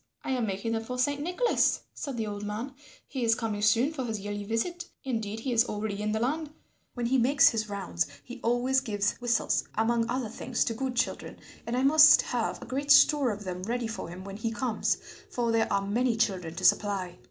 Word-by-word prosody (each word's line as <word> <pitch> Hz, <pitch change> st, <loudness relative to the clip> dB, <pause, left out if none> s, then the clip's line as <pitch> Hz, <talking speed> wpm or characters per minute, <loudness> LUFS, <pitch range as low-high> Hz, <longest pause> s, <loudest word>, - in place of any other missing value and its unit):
"I -, -, -3 dB
am 245 Hz, -4 st, 0 dB
making 200 Hz, +3 st, -3 dB
them 225 Hz, 0 st, -1 dB
for 250 Hz, +2 st, -5 dB
Saint 285 Hz, +3 st, 0 dB
Nicholas," 360 Hz, +10 st, +1 dB
said 275 Hz, -4 st, -5 dB
the 225 Hz, -, -1 dB
old 205 Hz, -1 st, -5 dB
man; 215 Hz, +6 st, -4 dB, 0.3 s
"he 260 Hz, -3 st, -4 dB
is 225 Hz, -1 st, +4 dB
coming 220 Hz, -3 st, -3 dB
soon 230 Hz, +8 st, +3 dB
for 270 Hz, -4 st, -3 dB
his 225 Hz, -3 st, -3 dB
yearly 205 Hz, +1 st, -5 dB
visit; 285 Hz, -, -2 dB, 0.2 s
indeed 225 Hz, -4 st, -3 dB
he 255 Hz, +1 st, -2 dB
is 230 Hz, +1 st, +4 dB
already 210 Hz, -2 st, -4 dB
in 210 Hz, 0 st, -1 dB
the 220 Hz, -, 0 dB
land; 295 Hz, +6 st, -1 dB, 0.5 s
when 245 Hz, -1 st, -2 dB
he 260 Hz, +2 st, +2 dB
makes 275 Hz, +3 st, +5 dB
his 220 Hz, -3 st, -2 dB
rounds 195 Hz, -, -2 dB, 0.2 s
he 250 Hz, +1 st, -10 dB
always 245 Hz, +3 st, +2 dB
gives 210 Hz, -5 st, 0 dB
whistles, 240 Hz, -2 st, +1 dB
among 230 Hz, +1 st, +1 dB
other 250 Hz, -2 st, -2 dB
things, 240 Hz, +2 st, -2 dB
to 230 Hz, -, -1 dB
good 255 Hz, +2 st, -3 dB
children, 240 Hz, -, -2 dB, 0.3 s
and 240 Hz, +1 st, -1 dB
I 255 Hz, -, +1 dB
must 300 Hz, +2 st, +7 dB
have -, -, -2 dB
a -, -, -9 dB
great 280 Hz, +2 st, -4 dB
store 285 Hz, -1 st, +6 dB
of 210 Hz, -1 st, -4 dB
them 180 Hz, -1 st, -5 dB
ready 235 Hz, +5 st, -2 dB
for 220 Hz, -6 st, -5 dB
him 180 Hz, +2 st, -8 dB
when 195 Hz, 0 st, -8 dB
he 225 Hz, +1 st, -2 dB
comes, 235 Hz, -1 st, 0 dB, 0.3 s
for 235 Hz, -2 st, -1 dB
there 225 Hz, 0 st, +1 dB
are 195 Hz, 0 st, +1 dB
many 230 Hz, +3 st, +1 dB
children 185 Hz, -7 st, -1 dB
to 185 Hz, -, -3 dB
supply." 190 Hz, -4 st, +2 dB
230 Hz, 220 wpm, -28 LUFS, 210-255 Hz, 0.5 s, must